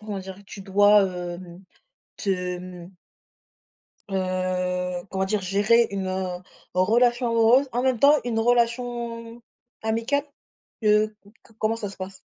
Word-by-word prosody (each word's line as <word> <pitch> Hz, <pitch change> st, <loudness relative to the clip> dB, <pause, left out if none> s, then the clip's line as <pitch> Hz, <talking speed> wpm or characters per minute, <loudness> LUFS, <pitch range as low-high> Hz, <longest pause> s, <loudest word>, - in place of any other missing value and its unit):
comment 210 Hz, -2 st, -5 dB
dire, 190 Hz, 0 st, -9 dB
tu 195 Hz, -, -9 dB
dois, 205 Hz, +2 st, +5 dB
hem, 180 Hz, -1 st, -5 dB, 0.6 s
te 180 Hz, -2 st, -2 dB
mmh 180 Hz, -1 st, -10 dB, 1.2 s
heu, 185 Hz, -1 st, -2 dB
comment 190 Hz, 0 st, -1 dB
dire? 210 Hz, +1 st, 0 dB
Gérer 210 Hz, +5 st, +3 dB
une, 195 Hz, -1 st, -3 dB
heu, 185 Hz, -1 st, -3 dB, 0.4 s
relation 240 Hz, +6 st, +3 dB
amoureuse, 230 Hz, +4 st, +4 dB
en 245 Hz, +2 st, 0 dB
même 260 Hz, -2 st, +1 dB
temps 285 Hz, +5 st, +6 dB
une 230 Hz, -2 st, -1 dB
relation 235 Hz, 0 st, -1 dB, 0.4 s
amicale? 230 Hz, +6 st, 0 dB, 0.6 s
Heu, 215 Hz, 0 st, +3 dB, 0.3 s
co 225 Hz, -, -23 dB
comment 220 Hz, +1 st, +1 dB
ça 210 Hz, -3 st, -5 dB
se -, -, -13 dB
passe? 190 Hz, 0 st, -8 dB
205 Hz, 130 wpm, -24 LUFS, 185-230 Hz, 1.2 s, temps